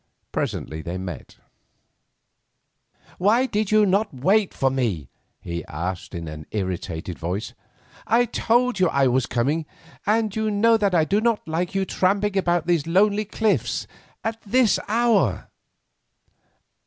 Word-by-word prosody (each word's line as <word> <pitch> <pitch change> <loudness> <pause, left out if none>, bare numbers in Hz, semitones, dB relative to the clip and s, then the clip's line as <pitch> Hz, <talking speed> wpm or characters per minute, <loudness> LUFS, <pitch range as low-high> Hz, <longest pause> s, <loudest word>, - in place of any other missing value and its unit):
Presently 80 +1 -3
they 85 +3 -5
met. 90 -7 -7 1.8
"Why 220 +7 +4
did 215 -5 -1
you 215 -1 +5
not 200 +3 +1
wait 190 +10 +2
for 135 -1 0
me?" 105 - -2 0.3
he 85 -1 -5
asked 90 +4 -5
in 85 -1 -5
an 75 0 -8
irritated 90 -3 -4
voice, 90 +5 -3 0.5
"I 235 +2 +4
told 240 0 +1
you 185 -2 +4
I 140 0 +2
was 130 0 +2
coming, 145 +7 0 0.4
and 215 -1 +1
you 220 0 0
know 220 +2 +4
that 200 -4 +1
I 160 -2 +4
do 205 +6 +1
not 230 -5 0
like 175 +4 -2
you 195 0 +1
to - - -8
be - - -11
tramping 200 +2 +2
about 175 -3 +1
these 170 -3 +1
lonely 205 +4 +3
cliffs 205 - 0 0.4
at 225 0 -3
this 235 +1 +3
hour." 215 - +2
185 Hz, 145 wpm, -23 LUFS, -, 1.8 s, you